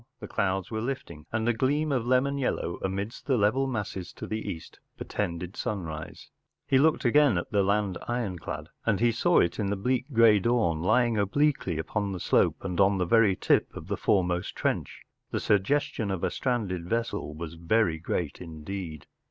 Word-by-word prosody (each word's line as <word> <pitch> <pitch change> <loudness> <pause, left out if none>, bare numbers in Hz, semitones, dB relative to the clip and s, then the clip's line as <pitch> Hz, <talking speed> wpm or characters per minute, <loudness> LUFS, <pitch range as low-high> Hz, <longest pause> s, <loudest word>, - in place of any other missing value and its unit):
The - - -7
clouds 95 0 -1
were 110 -1 -2
lifting, 85 - -5
and 110 +1 -1
a 120 - +4
gleam 145 +6 +1
of 125 -4 0
lemon 135 +2 +2
yellow 105 -9 -1
amidst 100 +4 -4
the 135 -3 +3
level 120 +6 +2
masses 100 -7 -4
to - - -7
the 110 0 -4
east 80 - -8 0.2
portended 90 -1 -4
sunrise. 80 -7 -5 0.3
He 135 - +3
looked 155 0 +3
again 135 -3 +5
at 85 - -4
the 100 -2 +3
land 100 -1 +1
ironclad. 115 -8 -3 0.2
As 110 -4 +2
he 120 +1 +4
saw 170 +10 +3
it 85 - 0
in 105 - 0
the 100 - 0
bleak, 125 +7 -1
grey 115 -3 +6
dawn, 95 -8 +1
lying 115 +3 +3
obliquely 105 - +1
upon 100 +5 -2
the 90 - -4
slope - - +2
and 90 -1 -3
on 100 0 +4
the 90 - +1
very 105 0 +4
lip - - +4
of - - -7
the - - 0
foremost 90 -2 0
trench, - - -2 0.3
the - - -2
suggestion 105 +1 +1
of 95 -3 -3
a - - +1
stranded 95 -9 -2
vessel 115 -9 -2
was 80 0 -6
very 85 0 +1
great 85 -1 -3
indeed. 80 -1 -7
105 Hz, 185 wpm, -28 LUFS, 90-120 Hz, 0.3 s, grey